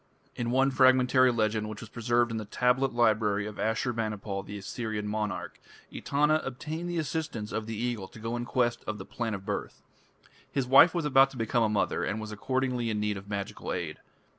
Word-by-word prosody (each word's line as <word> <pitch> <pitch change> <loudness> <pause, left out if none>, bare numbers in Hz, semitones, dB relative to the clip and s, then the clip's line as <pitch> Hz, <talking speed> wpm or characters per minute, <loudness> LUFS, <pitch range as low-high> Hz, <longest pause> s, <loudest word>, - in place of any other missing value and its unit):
In 120 -1 -2
one 135 +2 +3
fragmentary 130 -1 +5
legend 110 -2 0
which 105 -1 -7
was 115 - -9
preserved 120 0 +1
in 115 - -2
the 110 - -4
tablet 125 +5 +1
library 110 -3 +2
of 105 -1 -7
Ashur 115 +3 0
banipal, 105 -3 -3
the 105 +1 -7
Assyrian 105 +1 -4
monarch, 105 -4 -3 0.3
Etana 150 +2 +2
obtained 155 +6 -5
the 175 - -2
assistance 145 -8 -3
of 110 -1 -3
the 110 - -4
Eagle 115 -4 -2
to 110 - -14
go 115 +2 -3
in 120 - -2
quest 120 -1 0
of 105 - -2
the 95 - -8
Plant 115 -3 -3
of 95 0 -9
Birth. 100 -1 -4 0.7
His 135 -2 0
wife 140 +7 +7
was 170 -3 0
about 135 -1 +6
to 135 - -12
become 115 +1 +1
a 110 - +3
mother, 105 -2 0
and 105 - -2
was 110 0 -6
accordingly 125 +1 -1
in 105 -1 -1
need 105 0 0
of 100 +1 -9
magical 100 -1 -4
aid. - - -4
115 Hz, 205 wpm, -29 LUFS, 105-130 Hz, 0.7 s, wife